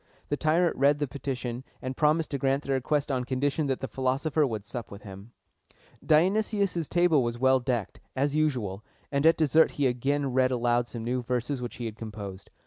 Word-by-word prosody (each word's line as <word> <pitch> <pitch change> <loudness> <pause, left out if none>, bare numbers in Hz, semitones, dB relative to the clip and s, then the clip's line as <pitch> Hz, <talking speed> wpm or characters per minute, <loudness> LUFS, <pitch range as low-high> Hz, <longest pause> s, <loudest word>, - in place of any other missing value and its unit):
The 145 - +1
tyrant 165 +4 +2
read 140 +2 +4
the 145 -1 -1
petition, 130 -2 -4 0.2
and 130 0 -5
promised 155 +2 +2
to 140 - -2
grant 135 +2 +1
their 140 - -1
request 140 +2 0
on 130 -2 0
condition 140 +4 -1
that 135 -1 -1
the 135 - -2
philosopher 135 +4 0
would 110 -4 -5
sup 120 0 -6
with 100 0 -11
him. 100 +2 -11 0.7
Dionysius' 190 +1 +2
table 175 -4 +3
was 120 -1 -2
well 130 +1 +4
decked, 120 -4 -2 0.2
as 140 +2 +1
usual, 125 -11 -1 0.3
and 140 +2 +3
at 165 - +5
dessert 160 +1 +4
he 145 - 0
again 135 +2 0
read 130 0 +3
aloud 120 -1 +1
some 115 -2 -6
new 125 +2 -1
verses 125 +2 -2
which 120 - -5
he 120 - -5
had 110 -1 -5
composed. 100 -4 -8
130 Hz, 195 wpm, -28 LUFS, 120-150 Hz, 0.7 s, at